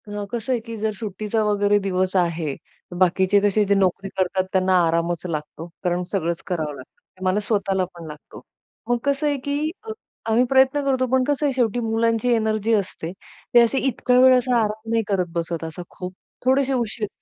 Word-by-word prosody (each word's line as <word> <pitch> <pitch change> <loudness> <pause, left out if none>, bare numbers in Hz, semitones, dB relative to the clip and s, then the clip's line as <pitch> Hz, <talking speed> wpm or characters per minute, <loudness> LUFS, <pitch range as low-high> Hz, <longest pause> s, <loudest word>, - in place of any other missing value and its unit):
अ, 205 0 -5
कसं 235 +2 -3
आहे, 245 - 0
की 230 0 -8
जर 215 +1 -1
सुट्टीचा 215 +1 -2
वगैरे 205 -1 +2
दिवस 185 -1 -1
आहे, 170 -5 0 0.4
बाकीचे 190 +2 +3
कसे 205 +1 +3
जे 200 0 +2
नोकरी 195 0 +1
करतात 185 0 +1
त्यांना 185 0 +3
आरामच 170 +1 -1
लागतो, 160 0 -5 0.2
कारण 180 0 0
सगळंच 170 -4 -1
करावं 160 -5 -2
लागतं. 130 -1 -13 0.2
ते 185 - -10
मला 185 +2 +2
स्वतःला 200 -3 0
पण 170 -1 -10
लागतो. 150 -1 -11 0.5
मग 240 - +3
कसं 280 +1 0
आहे, 290 -1 +1
की 285 +3 -2
अ, 445 - -6 0.4
आम्ही 225 +3 +4
प्रयत्न 265 +2 +4
करतो 260 -2 +2
पण 260 0 +3
कसं 290 0 0
आहे 280 - +1
शेवटी 245 -2 +1
मुलांची 230 +1 +1
एनर्जी 220 0 +1
असते. 185 -5 -2 0.4
ते 240 - +8
असे 235 +3 +2
इतक्या 250 0 +2
वेळ 255 0 +7
असा 250 0 +1
आराम 220 0 -2
नाही 230 -1 +2
करत 195 -3 +1
बसत 170 -1 -2
असा 160 +2 -6
खूप 180 -1 -7 0.3
थोडेसे 270 +1 +3
उशीर 225 -3 -2
210 Hz, 190 wpm, -22 LUFS, 185-245 Hz, 0.5 s, ते